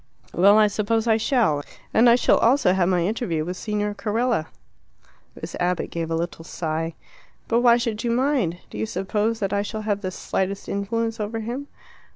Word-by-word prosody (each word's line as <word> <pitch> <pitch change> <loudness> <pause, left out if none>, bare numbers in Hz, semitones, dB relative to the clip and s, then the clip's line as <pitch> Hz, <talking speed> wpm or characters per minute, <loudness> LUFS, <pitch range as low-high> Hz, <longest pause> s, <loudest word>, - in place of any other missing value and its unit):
"Well, 200 +4 +6
I 215 - +6
suppose 215 +2 0
I 220 -2 +3
shall. 225 - +1 0.3
And 235 +2 +6
I 235 - +7
shall 245 - +3
also 235 -6 +4
have 185 -1 +2
my 175 -2 +2
interview 180 -7 -1
with 180 +2 -4
Signor 210 +1 -2
Carella." 215 -3 -1 0.9
Miss - - -7
Abbott 180 0 -1
gave 165 -1 -3
a 165 - 0
little 165 0 -4
sigh. 165 -1 -3 0.5
"But 235 +1 +2
why 240 -1 +6
should 230 -2 -2
you 240 - 0
mind? 245 - +1
Do 105 - -7
you 110 - -1
suppose 210 - -1
that 195 -1 -1
I 200 - +1
shall 215 +1 -5
have 205 -1 -1
the 185 - -2
slightest 190 +1 -3
influence 225 +3 -2
over 220 +2 -3
him?" 245 +6 -5
210 Hz, 190 wpm, -23 LUFS, 180-230 Hz, 0.9 s, I